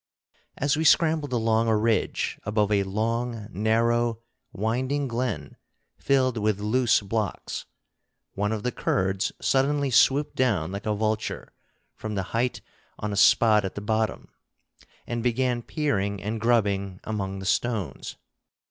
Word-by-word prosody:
As 145 0 +1
we 155 - -1
scrambled 155 -3 +3
along 115 -1 +1
a 110 -1 +3
ridge 110 +1 0
above 105 0 0
a 100 -1 +3
long 110 +3 -2
narrow 115 +3 +1 0.3
winding 130 +7 -1
glen 115 - -3 0.4
filled 130 -3 +1
with 105 -1 0
loose 115 +3 +2
blocks, 105 0 -3 0.7
one 105 +2 -1
of 110 -2 -3
the 125 - 0
Kurds 95 -3 0
suddenly 140 +1 +1
swooped 140 +4 +3
down 100 -10 +1
like 100 +2 -5
a 105 - +1
vulture 110 +1 -2 0.4
from 110 -1 -6
the 95 - -1
height 120 +2 0 0.4
on 105 -1 -3
a - - -2
spot 105 +1 +5
at 95 - -4
the - - -3
bottom, 110 +1 -1 0.8
and 120 -1 -3
began 125 0 0
peering 100 -9 -1
and 105 +3 -4
grubbing 100 -5 +1
among 100 -3 -3
the 95 - -7
stones. 105 - -2
110 Hz, 140 wpm, -26 LUFS, 105-125 Hz, 0.8 s, spot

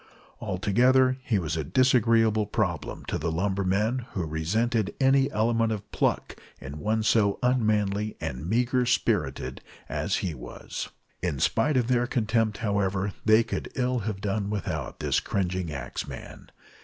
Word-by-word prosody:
Altogether 130 +7 +3
he 115 -4 +1
was 80 -4 -2
a 80 - -1
disagreeable 115 - +3
problem 90 - -2
to - - -2
the 80 +2 -1
lumbermen, 100 +7 0
who 90 -4 -2
resented 105 +8 0
any 135 0 +4
element 115 +1 +1
of 105 -2 -5
pluck - - 0 0.2
in 70 +3 -8
one 110 +7 0
so 105 -2 +3
unmanly 105 -4 +1
and 70 +7 -4
meagre 125 +2 +2
spirited 95 - 0 0.3
as - - -1
he 90 - -2
was. 65 - -7 0.3
In 85 -6 -1
spite 130 - +2
of 125 - +2
their 120 0 +1
contempt, 110 -3 +1
however, 100 -1 0
they 110 +1 +6
could 115 - -4
ill 125 -1 0
have 105 -2 -4
done 100 0 -1
without 105 -2 -4
this - - +2
cringing 90 -3 -2
axeman. 65 -4 -7
105 Hz, 145 wpm, -27 LUFS, 95-120 Hz, 0.3 s, they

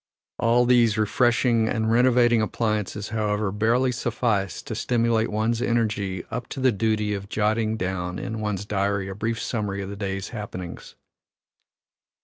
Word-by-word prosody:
All 120 +1 +3
these 120 -3 +4
refreshing 115 +1 +2
and 110 -1 0
renovating 120 -1 +4
appliances, 105 -2 -2
however, 105 -2 -1
barely 115 +5 +2
suffice 115 -5 -1
to - - -6
stimulate 115 -2 +1
one's 110 +2 0
energy 105 -6 0
up 120 +2 -4
to - - -6
the 130 -1 +4
duty 105 0 0
of 100 0 -5
jotting 110 +1 0
down 90 -2 -3
in 110 +3 -4
one's 105 -2 -2
diary 100 -1 -1
a - - -4
brief 110 +3 -2
summary 105 -3 -2
of 95 - -6
the - - -6
day's 95 -1 -4
happenings. 95 -6 -7
110 Hz, 145 wpm, -24 LUFS, 100-115 Hz, -, these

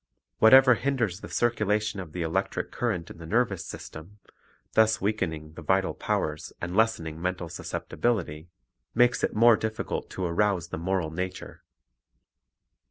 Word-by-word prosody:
Whatever 130 +4 +8
Moral 115 - +4
Effect - - -12
hinders 115 -10 0
the - - -8
circulation 105 -3 0
of 90 -5 -7
the 85 +1 -3
electric 80 0 -2
current 100 -9 -2
in - - -12
the 80 - -9
nervous 100 -3 +1
system, 80 +4 -10 0.6
thus 110 0 +4
weakening 80 -7 -2
the 85 - -10
vital 95 +4 +1
powers 75 0 -2
and 90 +1 -4
lessening 85 -8 +1
mental 90 -1 -2
susceptibility, 85 -6 -3 0.5
makes 120 +1 +3
it - - 0
more 115 +1 +7
difficult 110 0 -3
to 95 - -4
arouse 90 0 0
the 80 - -5
moral 90 -2 -1
nature. 90 +3 -5
95 Hz, 150 wpm, -27 LUFS, 85-110 Hz, 0.6 s, Whatever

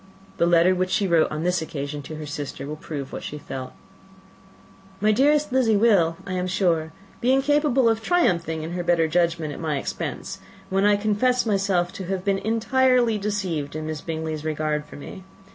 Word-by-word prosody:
The 170 - +3
letter 175 +2 +5
which 185 0 -1
she 200 +1 +1
wrote 170 -3 +3
on 155 +1 -4
this 180 -1 +1
occasion 145 -2 -5
to 155 +3 -8
her 155 0 -6
sister 145 -2 -5
will 150 +2 -5
prove 145 -3 -7
what - - -5
she 150 - -6
felt: 130 -3 -7 1.3
"My 215 +1 +3
dearest 290 +6 +3
Lizzy 235 -5 +3
will, 195 -7 +3
I 185 - -4
am 180 0 -1
sure, 170 -4 +1 0.3
be 245 - +3
incapable 270 -1 +3
of 225 -1 +2
triumphing 175 - +1
in 160 - -5
her 175 0 -3
better 170 -2 +2
judgment, 165 -2 0
at - - -8
my 155 -3 -1
expense, - - -5 0.3
when 195 +1 +2
I 205 0 +5
confess 220 +4 +1
myself 195 -4 +1
to 190 - -6
have 190 +1 -3
been 195 -1 +1
entirely 235 +1 +2
deceived 185 -8 -2
in 155 0 -4
Miss 155 -1 -4
Bingley's 160 -2 -4
regard 155 -1 -1
for - - -13
me. 190 +6 -9
180 Hz, 190 wpm, -24 LUFS, 155-215 Hz, 1.3 s, letter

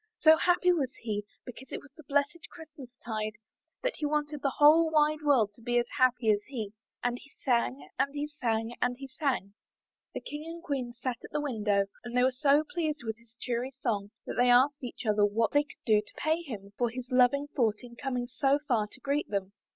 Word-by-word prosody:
So 315 0 +7
happy 355 +2 +3
was 275 -7 0
he 210 -2 -2 0.2
because 250 +2 -10
it - - -3
was 285 - -17
the - - -12
blessed 285 +4 0
Christmas 295 -7 -12
tide, 215 -2 -2 0.5
that - - -1
he 300 - -1
wanted 295 -1 -1
the 275 -2 -1
whole 315 +3 +7
wide 305 0 +3
world 255 -9 +3
to 230 - -17
be 240 +1 0
as 240 - +3
happy 250 -3 +4
as 205 -1 +2
he. 220 -7 -5 0.3
And 245 0 0
he 280 - -16 0.2
sang, 150 - +1
and 280 - +2
he 290 0 -1
sang, 235 -6 -2
and 245 0 +1
he 270 +1 -8
sang. 260 -7 -2 0.6
The - - -3
King 295 +1 -6
and 335 0 -8
Queen 260 -5 -2
sat 245 0 -4
at - - -9
the 300 - -2
window, 210 -8 +1 0.2
and 240 +1 -4
they 250 - +5
were 260 - +4
so 280 +3 +3
pleased 320 -6 -2
with 220 -1 -4
his 230 -1 -23
cheery 250 +2 -2
song 205 -6 -1 0.2
that - - -5
they 245 0 +4
asked 265 +4 +4
each 245 0 -6
other 210 -1 +3
what 210 +2 +2
they 290 - +5
could 300 - -17
do 215 -2 +4
to 210 - -14
pay 315 +2 +1
him 205 -10 -8
for 240 -1 +2
his 250 +2 -7
loving 255 +3 +4
thought 225 -5 +1
in 240 -1 -11
coming 250 -2 -2
so 270 +3 +2
far 220 -5 +2
to 260 - -14
greet 285 +3 0
them. 200 -1 -2
250 Hz, 220 wpm, -30 LUFS, 225-290 Hz, 0.6 s, So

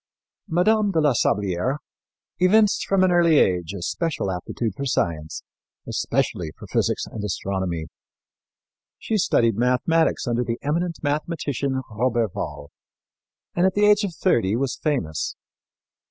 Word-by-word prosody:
Mme. 205 +5 +3
de 165 - +2
la 150 -3 +3
Sablière 100 +4 0 0.6
evinced 205 +3 +4
from 195 -1 +3
an 185 - +4
early 170 -3 +4
age 90 - +2
a 90 - -6
special 160 - -2
aptitude 95 +4 -3
for 140 - -5
science, 80 - -2 0.4
especially 85 -3 -1
for - - -10
physics - - 0
and 105 - -7
astronomy. 95 -4 -2 1.1
She 220 - -1
studied 115 - +2
mathematics 125 +7 +2
under 120 0 +1
the 115 -1 -3
eminent 165 +3 -2
mathematician, 145 -3 -2
Roberval, 115 - -2 0.8
and 175 +2 +3
at 190 - -1
the 205 0 +4
age 210 0 +5
of 185 -5 -3
thirty 110 - +2
was 130 +1 -1
famous. 95 - -2
130 Hz, 130 wpm, -23 LUFS, -, 1.1 s, age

